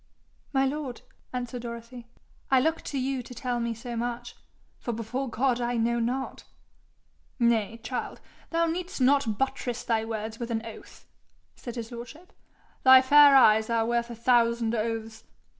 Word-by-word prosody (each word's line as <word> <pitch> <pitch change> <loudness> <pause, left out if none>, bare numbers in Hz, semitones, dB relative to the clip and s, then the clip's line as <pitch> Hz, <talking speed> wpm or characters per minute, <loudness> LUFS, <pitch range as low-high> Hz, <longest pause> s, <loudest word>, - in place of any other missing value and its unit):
'My 270 -1 +2
lord,' 270 -2 -4 0.3
answered 245 -1 -4
Dorothy, 235 0 -8 0.4
'I 265 - +5
look 320 +3 0
to 280 - -4
you 265 0 -1
to 250 +1 -11
tell 245 +1 -2
me 235 -1 -2
so 235 +1 -7
much, 240 +1 -4 0.4
for 240 - -4
before 240 +4 -3
God 245 +1 0
I 240 0 -1
know 235 +1 +1
not.' 250 +3 -3 0.9
'Nay, 230 -2 +1
child! 250 - -4 0.3
thou 335 0 +1
need'st 345 +1 -3
not 260 -5 +3
buttress 250 -2 -2
thy 225 -2 0
words 225 0 -5
with 235 -1 -4
an 225 -1 -2
oath,' 225 - -12 0.5
said 240 -1 -8
his 230 -1 -6
lordship. 245 +10 -10 0.5
'Thy 260 0 +8
fair 285 +1 +7
eyes 220 -4 +6
are 230 -1 +1
worth 235 0 0
a 235 - -6
thousand 235 -1 +2
oaths. 225 0 -3
240 Hz, 160 wpm, -27 LUFS, 230-260 Hz, 0.9 s, Thy